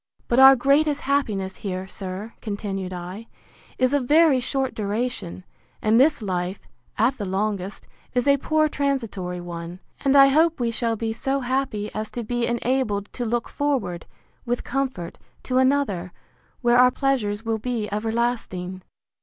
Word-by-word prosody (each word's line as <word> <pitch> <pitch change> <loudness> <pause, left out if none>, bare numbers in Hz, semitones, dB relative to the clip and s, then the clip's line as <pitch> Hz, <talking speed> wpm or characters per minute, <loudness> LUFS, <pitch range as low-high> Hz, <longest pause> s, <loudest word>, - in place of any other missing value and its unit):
But 240 - +2
our 270 0 +10
greatest 285 +3 +2
happiness 215 -9 -1
here, 190 -1 -4
sir, 190 +3 -6
continued 200 -3 -4
I, 180 +5 -7 0.5
is 255 +1 +2
of 285 -3 +1
very 305 -2 +5
short 265 +1 -1
duration; 210 -3 -3 0.4
and 220 +2 +3
this 280 -3 +3
life, 185 -1 -3 0.3
at 245 +4 +2
the 205 - -2
longest, 195 0 -2 0.3
is 245 +2 +1
a 280 0 +5
poor 310 +2 +2
transitory 230 -12 -2
one; 175 0 -7 0.2
and 275 0 +3
I 275 -1 +8
hope 320 +3 +3
we 235 -1 0
shall 230 0 0
be 225 0 -2
so 270 +4 -1
happy 250 -5 -2
as 215 0 -4
to 240 - -2
be 240 +1 -1
enabled 235 -4 -1
to 245 - -3
look 235 +1 -1
forward, 255 - -2 0.4
with 245 -1 -2
comfort, 260 -10 -3 0.2
to 255 0 +1
another, 260 -10 +1 0.5
where 240 0 +4
our 250 0 +7
pleasures 230 -6 -1
will 225 -1 -1
be 230 -2 -2
everlasting. 210 -4 -2
235 Hz, 155 wpm, -24 LUFS, 200-270 Hz, 0.5 s, our